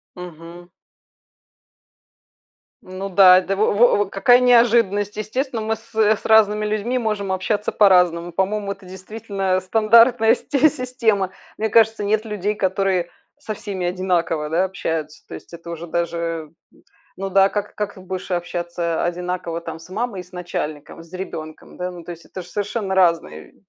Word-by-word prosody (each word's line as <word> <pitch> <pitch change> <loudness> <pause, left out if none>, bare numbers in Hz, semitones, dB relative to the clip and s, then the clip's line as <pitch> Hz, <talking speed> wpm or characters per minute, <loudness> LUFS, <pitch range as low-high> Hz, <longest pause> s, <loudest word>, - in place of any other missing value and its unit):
Мгм. 175 0 -11 2.1
Ну 185 +2 -6
да, 185 -1 +7
это 190 +1 -2
во 205 +1 +2
во 205 -1 +4
в - - -14
какая 245 +6 +4
неожиданность! 230 -5 +3
Естественно, 230 +2 -3
мы 220 +1 -1
с 225 +1 -20
с 215 -1 +2
разными 215 -1 +4
людьми 215 +4 -1
можем 210 -4 -2
общаться 205 +3 -1
по-разному. 180 -4 +3
По-моему, 200 +3 -1
это 195 -1 -18
действительно 195 0 -3
стандартная 225 +3 +4
сте 285 +4 +2
система. 235 -8 -1 0.3
Мне 220 +1 -1
кажется, 220 -1 +3
нет 215 +2 +1
людей, 210 -1 -2
которые 190 -3 0 0.3
со 215 - -5
всеми 190 -4 -4
одинаково, 175 -4 -1
да, 175 +4 +2
общаются. 160 -4 -4
То - - -11
есть - - -11
это 170 0 -9
уже 170 +1 -7
даже, 165 -2 -3 0.7
ну 195 +1 -4
да, 195 +1 +5
как 205 0 -4
как 210 -1 -4
ты 190 - -13
будешь 185 0 -6
общаться 175 -1 -2
одинаково 175 -1 -3
там 165 -1 -7
с 165 - -15
мамой 210 +1 -3
и - - -11
с 180 - -23
начальником, 165 -4 -6
с 165 - -20
ребёнком? 155 -4 -8
Да, 180 0 -3
ну 175 -1 -10
то 175 - -8
есть 170 -1 -11
это 185 - -8
ж - - -15
совершенно 205 +1 -3
разные 170 - +1
190 Hz, 160 wpm, -21 LUFS, 175-215 Hz, 2.1 s, да